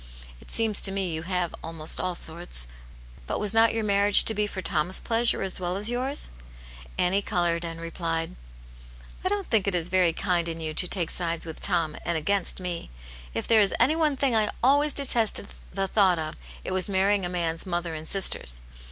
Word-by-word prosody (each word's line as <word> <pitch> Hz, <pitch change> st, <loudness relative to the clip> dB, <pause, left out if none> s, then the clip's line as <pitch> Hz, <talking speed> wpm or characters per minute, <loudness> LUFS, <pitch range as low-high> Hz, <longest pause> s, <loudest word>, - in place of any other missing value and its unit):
" -, -, -18 dB
It -, -, -16 dB
seems 225 Hz, -2 st, +2 dB
to 195 Hz, -, +7 dB
me 190 Hz, -3 st, -2 dB
you 160 Hz, -, -4 dB
have 180 Hz, 0 st, -3 dB
almost 165 Hz, -1 st, -4 dB
all 185 Hz, -1 st, -2 dB
sorts. 165 Hz, -, -1 dB, 0.6 s
But -, -, -3 dB
was 210 Hz, 0 st, -1 dB
not 225 Hz, 0 st, +4 dB
your 225 Hz, -1 st, -3 dB
marriage 205 Hz, 0 st, +6 dB
to 220 Hz, -, +4 dB
be 210 Hz, 0 st, -1 dB
for 200 Hz, -, -7 dB
Tom's 170 Hz, +1 st, +1 dB
pleasure, 230 Hz, -1 st, +3 dB
as 190 Hz, -1 st, +3 dB
well 180 Hz, 0 st, -3 dB
as 210 Hz, +4 st, +2 dB
yours? 260 Hz, +4 st, -1 dB, 0.3 s
" -, -, -18 dB, 0.3 s
Annie 185 Hz, +3 st, +1 dB
coloured, 175 Hz, -4 st, -1 dB
and 165 Hz, -1 st, -6 dB
replied: 165 Hz, -1 st, -4 dB, 0.5 s
" -, -, -20 dB
I 370 Hz, -, 0 dB
don't 405 Hz, -1 st, -2 dB
think 215 Hz, -4 st, +2 dB
it 195 Hz, -, +1 dB
is 175 Hz, 0 st, -2 dB
very 180 Hz, -2 st, +2 dB
kind 170 Hz, 0 st, -1 dB
in 165 Hz, 0 st, -6 dB
you 155 Hz, -1 st, -4 dB
to 180 Hz, -, +1 dB
take 175 Hz, -3 st, +1 dB
sides 170 Hz, -2 st, -3 dB
with 160 Hz, -1 st, -8 dB
Tom, 160 Hz, -2 st, +1 dB
and 170 Hz, -1 st, -2 dB
against 195 Hz, +5 st, 0 dB
me! 180 Hz, -2 st, -6 dB, 0.5 s
If -, -, -3 dB
there 225 Hz, -2 st, +5 dB
is 200 Hz, -, +1 dB
any 265 Hz, +7 st, +3 dB
one 305 Hz, -4 st, 0 dB
thing 265 Hz, -2 st, 0 dB
I 215 Hz, -1 st, +1 dB
always 285 Hz, +3 st, +3 dB
detested 235 Hz, -7 st, +2 dB, 0.2 s
the 195 Hz, +1 st, -2 dB
thought 190 Hz, -3 st, +2 dB
of, 155 Hz, 0 st, -4 dB, 0.3 s
it -, -, -6 dB
was 185 Hz, +1 st, 0 dB
marrying 195 Hz, +1 st, +1 dB
a 175 Hz, -, -3 dB
man's 170 Hz, -1 st, -3 dB
mother 175 Hz, -2 st, -3 dB
and 155 Hz, 0 st, -6 dB
sisters. 120 Hz, -, +2 dB
185 Hz, 215 wpm, -25 LUFS, 165-210 Hz, 0.6 s, to